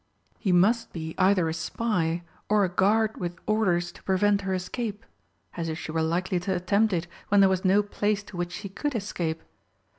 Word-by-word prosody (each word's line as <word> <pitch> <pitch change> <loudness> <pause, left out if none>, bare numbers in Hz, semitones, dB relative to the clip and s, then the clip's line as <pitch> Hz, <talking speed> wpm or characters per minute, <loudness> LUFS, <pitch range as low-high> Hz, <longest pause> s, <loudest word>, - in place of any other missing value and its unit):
He 195 - 0
must 225 +6 +3
be 160 -1 -5
either 185 -2 +4
a 160 - -1
spy, 170 -1 -1 0.3
or 210 -1 +4
a - - -2
guard 215 +4 +2
with 175 0 -4
orders 180 -5 +1
to - - -16
prevent 200 +1 +2
her 195 -1 -2
escape 210 +3 -4 0.5
as 165 -1 -3
if 160 - -3
she 155 - -6
were 160 0 0
likely 175 +3 0
to 185 +2 -1
attempt 200 +5 +2
it 175 -2 0 0.2
when 205 - +4
there 195 - +7
was 190 -1 0
no 200 +2 +4
place 205 0 -1
to 200 - -12
which 175 0 -3
she 170 +3 -6
could 280 +8 -3
escape! 170 -6 -3
190 Hz, 200 wpm, -27 LUFS, 175-205 Hz, 0.5 s, there